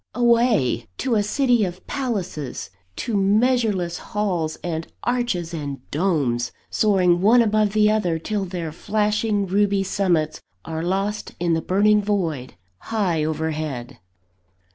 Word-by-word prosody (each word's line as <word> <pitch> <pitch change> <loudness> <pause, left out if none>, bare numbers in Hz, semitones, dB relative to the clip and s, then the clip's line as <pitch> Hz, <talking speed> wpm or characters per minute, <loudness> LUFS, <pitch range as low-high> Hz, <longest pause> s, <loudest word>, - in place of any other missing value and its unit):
Away! 235 - +2
to 255 -2 -1
a 215 - +3
City 240 +2 +2
of 180 -1 -4
Palaces, 190 - -4 0.2
to 230 -3 -3
measureless 205 -3 +2
halls, 180 -7 -2
and 165 -2 -3 0.2
arches, 235 -9 -1
and 140 -5 -5
domes, 140 -9 0 0.2
soaring 185 -5 +3
one 235 +5 +6
above 215 -1 +1
another, 210 -5 +3
till 200 +4 -2
their 175 -3 -4
flashing 210 +3 0
ruby 200 +1 +2
summits 180 -6 0 0.2
are 160 0 -4
lost 195 +4 -2
in 170 -1 +1
the 160 - +1
burning 210 +4 +3
void, 170 -11 -2 0.2
high 190 -8 0
overhead. 155 -5 -3
195 Hz, 120 wpm, -22 LUFS, 160-215 Hz, 0.2 s, one